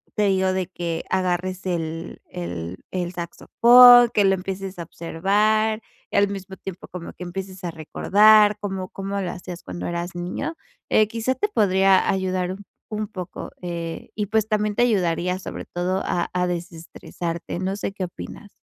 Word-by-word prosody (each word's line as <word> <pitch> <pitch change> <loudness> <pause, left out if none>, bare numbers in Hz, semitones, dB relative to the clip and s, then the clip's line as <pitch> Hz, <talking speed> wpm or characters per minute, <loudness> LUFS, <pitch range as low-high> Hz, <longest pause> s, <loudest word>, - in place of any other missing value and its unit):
te 210 - +2
digo 190 -1 +2
de 185 -1 -1
que 170 -3 -4
agarres 185 0 -1
el 165 -2 -4
el 85 0 -5
el 180 -1 -3
saxofón, 240 +7 +7
que 205 - +4
lo 195 - +5
empieces 190 0 -5
a 170 - -3
observar, 210 +7 +1 0.3
al 200 0 +4
mismo 195 -1 -7
tiempo 190 -2 -8
como 175 -2 -8
que 180 - -9
empieces 190 +1 -7
a 175 - -2
recordar 210 +6 +5
cómo 190 -2 -4
cómo 195 +1 -4
lo 180 - -2
hacías 175 -1 -8
cuando 175 - -5
eras 175 +1 -4
niño, 180 - -4 0.3
eh, 215 -1 +4
quizás 230 +3 -2
te 415 - +2
podría 195 - +3
ayudar 185 -1 0
un 195 +2 -8 0.3
un 215 -1 -3
poco, 185 -3 -7
eh, 170 -2 -5
y 210 -1 -2
pues 220 +1 +1
también, 210 -1 0
te 240 - +3
ayudaría 180 -4 +1
sobre - - -7
todo 185 +2 -2
a 175 - -1
a 180 0 +1
desestresarte, 170 0 -5
no 190 +1 -1
sé, 200 - -3
¿qué 195 - -4
opinas? 205 +3 -10
185 Hz, 165 wpm, -23 LUFS, 175-205 Hz, 0.3 s, saxofón